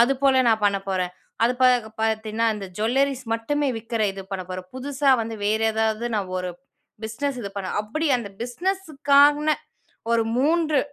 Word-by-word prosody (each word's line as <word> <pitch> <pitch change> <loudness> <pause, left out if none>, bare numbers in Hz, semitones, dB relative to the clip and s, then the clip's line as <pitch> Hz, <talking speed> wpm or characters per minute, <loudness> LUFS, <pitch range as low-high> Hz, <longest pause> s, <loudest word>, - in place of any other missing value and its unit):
அதுபோல 265 +1 +4
நான் 220 -1 +2
பண்ண 200 -1 +3
போறேன். 185 -2 -1 0.3
அது 240 - +3
பார்க்- 245 -3 +4
பார்த்தீன்னா, 220 0 0
அந்த 200 -2 -6
ஜூவல்லரீஸ் 260 +3 +1
மட்டுமே 290 +5 -1
விற்கிற 225 0 -2
இது 195 0 -7
பண்ண 190 -1 -2
போறேன். 185 0 -6
புதுசா 275 +1 0
வந்து 225 0 -5
வேறு 220 +2 +1
ஏதாவது, 220 +1 0
நான் 190 -3 -3
ஒரு 180 0 -3 0.5
பிஸினஸ் 255 +4 -3
இது 200 - -4
பண்ண 190 -2 -3
அப்படி 310 +10 -2
அந்த 215 -4 -6
பிஸினஸ்க்கானா 295 -1 +3 0.6
ஒரு 230 -1 +3
3 310 +1 +2
235 Hz, 155 wpm, -24 LUFS, 215-280 Hz, 0.6 s, அதுபோல